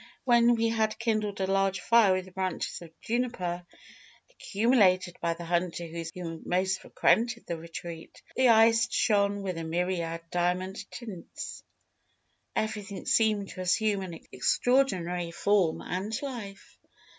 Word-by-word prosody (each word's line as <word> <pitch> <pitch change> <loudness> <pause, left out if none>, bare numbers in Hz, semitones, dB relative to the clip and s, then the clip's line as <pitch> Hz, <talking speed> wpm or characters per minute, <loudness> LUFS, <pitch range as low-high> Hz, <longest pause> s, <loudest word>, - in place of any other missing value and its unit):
When 240 -1 +5
we 230 0 +1
had 220 -1 0
kindled 215 -3 -1
a - - +2
large 195 0 +1
fire 230 -4 +5
with 185 0 -3
branches 185 -2 -3
of 170 - -10
juniper, 220 -8 -2 0.7
accumulated 200 - +2
by 170 0 0
the 170 0 -8
hunter 175 0 -1
who 165 0 -6
most 190 +2 0
frequented 235 +1 +1
the 170 - -3
retreat, 165 0 -8 0.2
the 260 -1 +4
ice 225 +1 +5
shone 200 -2 +2
with 185 -3 -3
a - - -4
myriad 170 0 -2
diamond 185 +3 -1
tints; 215 -8 -8 0.9
everything 210 -2 -3
seemed 215 -3 +2
to 185 - -7
assume 200 +2 +1
an 170 -4 -7
extraordinary 180 - +1
form 185 -1 +1
and 200 +5 -3
life. 220 -8 -8
190 Hz, 130 wpm, -28 LUFS, 175-220 Hz, 0.9 s, When